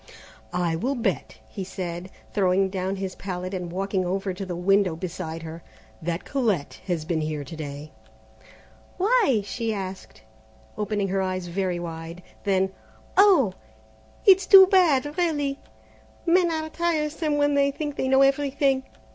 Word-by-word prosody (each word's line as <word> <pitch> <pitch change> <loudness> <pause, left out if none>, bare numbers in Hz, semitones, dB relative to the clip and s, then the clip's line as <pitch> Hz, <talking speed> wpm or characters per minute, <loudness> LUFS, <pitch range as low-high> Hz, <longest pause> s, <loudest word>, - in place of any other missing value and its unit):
"I 175 -2 0
will 255 +11 -1
bet," 235 - -2
he 195 - -6
said, 180 -1 -5 0.2
throwing 190 -1 +2
down 190 0 -2
his 190 -1 -4
palette 185 -1 -5
and 180 -2 -4
walking 195 +1 -1
over 190 +2 -2
to 195 +2 -6
the 175 - -4
window 190 0 +2
beside 165 -2 -5
her, 165 +1 -8 0.4
"that 170 +1 -3
Colette 220 - -1
has 170 -4 -1
been 160 -1 -1
here 155 -1 -3
to 140 +4 -9
day." 150 0 -7 1.1
"Why?" 400 - +3
she 230 +2 -2
asked, 190 - -7 0.5
opening 205 -2 -1
her 195 +1 0
eyes 185 -1 -2
very 180 0 -2
wide. 165 +1 -7 0.2
Then, 190 -1 +2 0.4
"Oh, 365 - +5 0.7
it's 385 -1 +6
too 385 -1 +10
bad! 320 -6 +3
really, 290 -5 0 0.7
men 350 0 +4
are 315 -1 -2
tiresome 310 -2 -1
when 290 0 +2
they 280 0 +3
think 290 0 -4
they 260 - -1
know 265 +1 +5
everything! 275 -1 +2
195 Hz, 145 wpm, -25 LUFS, 180-280 Hz, 1.1 s, too